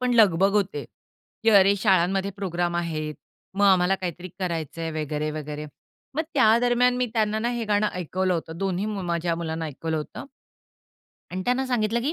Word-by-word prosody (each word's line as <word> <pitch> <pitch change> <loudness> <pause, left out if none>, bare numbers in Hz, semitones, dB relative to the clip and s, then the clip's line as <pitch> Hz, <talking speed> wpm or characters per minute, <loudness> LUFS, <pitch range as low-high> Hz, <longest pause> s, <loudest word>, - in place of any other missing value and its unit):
पण 250 0 +1
लगबग 195 -4 +5
होते, 190 -8 0 0.6
की 225 - +4
अरे 200 -1 +6
शाळांमध्ये 195 0 +2
प्रोग्राम 175 -3 -1
आहेत. 155 -3 -2 0.4
मग 205 +1 +2
आम्हाला 190 -1 +4
काहीतरी 180 0 -5
करायचंय 165 -3 -3
वगैरे-वगैरे. 150 0 -4 0.5
मग 315 - +1
त्या 225 -5 +5
दरम्यान 245 +1 +3
मी 250 0 +1
त्यांना 215 -1 +1
ना, 230 +2 0
हे 240 -1 -2
गाणं 210 0 +2
ऐकवलं 180 +1 -1
होतं. 160 -1 -4
दोन्ही 195 +1 -1
मी 210 -3 -3
माझ्या 170 -1 -1
मुलांना 165 -1 -3
ऐकवलं 160 +2 -3
होतं 150 - -6 1.1
आणि 185 +1 -3
त्यांना 255 +2 +1
सांगितलं 235 -2 +1
की 280 +6 -1
190 Hz, 165 wpm, -25 LUFS, 165-215 Hz, 1.1 s, अरे